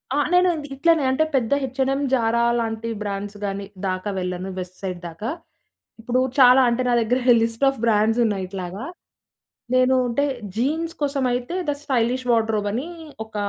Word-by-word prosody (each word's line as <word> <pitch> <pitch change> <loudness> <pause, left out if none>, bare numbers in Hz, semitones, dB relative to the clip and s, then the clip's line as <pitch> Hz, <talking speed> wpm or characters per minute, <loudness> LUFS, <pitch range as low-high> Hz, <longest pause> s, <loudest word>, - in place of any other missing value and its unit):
ఆ! - - +1 0.2
నేను 360 +1 +5
ఇది 295 -2 -6
ఇట్లనే 325 +1 +3
అంటే 265 +4 +2
పెద్ద 240 -2 0
హెచ్ 260 0 -5
అండ్ 265 - +2
ఎమ్, 280 +1 -1
జారా 235 -2 +2 0.2
లాంటి 225 0 -3
బ్రాండ్స్ 205 0 -4
గానీ, 195 0 -3 0.2
దాకా 185 +2 -2
వెళ్ళను. 180 +1 -4
వెస్ట్ 180 0 -7
సైడ్ 185 -2 -4
దాకా. 170 +8 -5 0.7
ఇప్పుడు 245 +2 0 0.2
చాలా 255 0 +8
అంటే, 235 +2 0
నా 245 - +3
దగ్గర 245 +3 +1 0.2
లిస్ట్ 230 +3 -2
ఆఫ్ 270 - -4
బ్రాండ్సున్నాయి 215 -2 +2
ఇట్లాగా. 190 +4 -6 0.9
నేను 255 +1 +4
అంటే 280 +5 +1 0.3
జీన్స్ 315 +8 -1
కోసమైతే 260 0 -1
థ - - +3
స్టైలిష్ 250 -2 0
వార్డ్‌రోబ్ 220 -2 +1
అని 260 +8 -3 0.4
ఒక 220 - -20
235 Hz, 160 wpm, -22 LUFS, 205-265 Hz, 0.9 s, చాలా